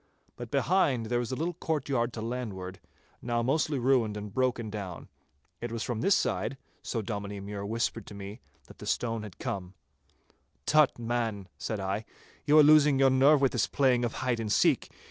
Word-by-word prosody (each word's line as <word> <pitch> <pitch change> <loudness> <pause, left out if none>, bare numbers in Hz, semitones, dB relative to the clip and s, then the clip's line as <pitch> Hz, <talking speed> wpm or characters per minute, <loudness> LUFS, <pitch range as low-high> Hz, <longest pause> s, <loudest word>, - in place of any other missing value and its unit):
But - - -8
behind 145 -10 +2
there 120 +2 0
is 120 - -4
a - - -1
little 165 +5 -2
courtyard 140 -7 -1
to 110 - -5
landward, 100 -6 -5 0.4
now 120 -1 -1
mostly 145 +3 +1
ruined 120 -4 +2
and 105 -1 -7
broken 120 -4 0
down. 100 -5 -6 0.5
It 120 -1 -4
was 115 -1 -3
from 120 -3 -3
this 195 - +4
side, 105 +7 -1 0.2
so 115 -3 -3
Dominie 100 -1 -4
Mure 100 0 -6
whispered 115 -1 -2
to 105 - -9
me, 100 +3 -8 0.2
that - - -16
the - - -8
stone 115 -2 -1
had 105 -4 -9
come. 95 -1 -5 0.9
'Tut, 155 -2 +4
man,' 115 -4 -2
said 110 -3 -3
I, 100 +3 -2 0.4
'you 150 +1 +6
are 155 - +9
losing 150 -2 +6
your 135 0 +5
nerve 140 +3 +5
with 135 - +3
this - - +1
playing 130 -3 +2
of 120 - -1
hide 125 -3 -1
and 110 -2 -2
seek. - - +3
120 Hz, 185 wpm, -29 LUFS, 105-135 Hz, 0.9 s, are